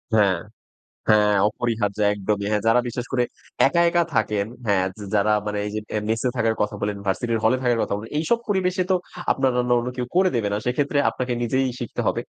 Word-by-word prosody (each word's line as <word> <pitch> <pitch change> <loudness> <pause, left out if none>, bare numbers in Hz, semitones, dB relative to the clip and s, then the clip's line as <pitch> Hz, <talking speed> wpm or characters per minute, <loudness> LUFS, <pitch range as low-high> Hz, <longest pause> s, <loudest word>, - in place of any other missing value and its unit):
হ্যাঁ। 100 -5 +3 0.7
হ্যাঁ, 105 -1 +5
অপরিহার্য 110 -3 -2
একদমই। 100 0 -2
হ্যাঁ, 105 -1 +1
যারা 115 +2 +5
বিশ্বাস 120 +1 -4
করে 125 -1 +2 0.4
একা 170 +5 +2
একা 175 0 +3
থাকেন, 105 -2 +1 0.2
হ্যাঁ, 95 -2 +2
যা 105 - -7
যারা 105 +1 +3
মানে 105 0 -2
এইযে 105 +1 -3 0.3
মেসে 115 +3 0
থাকার 115 -1 +1
কথা 105 0 -2
বলেন, 105 0 -1
ভার্সিটির 115 +3 0
হলে 120 +4 +4
থাকার 120 -2 +2
কথা - - -1
বলেন। 110 +2 -8
এইসব 230 +9 +1
পরিবেশে 185 -2 +1
তো 185 - +5 0.4
আপনার 135 -1 +1
রান্না 125 0 +2
অন্য 120 +1 -2
কেউ 125 -1 -2
করে 185 -1 +4
দেবে 105 -3 0
না। - - +1
সেক্ষেত্রে 145 +3 0
আপনাকে 125 -1 -3
নিজেই 130 +3 +1
শিখতে 120 - -4
হবে। - - +1
115 Hz, 195 wpm, -23 LUFS, 105-125 Hz, 0.7 s, হ্যাঁ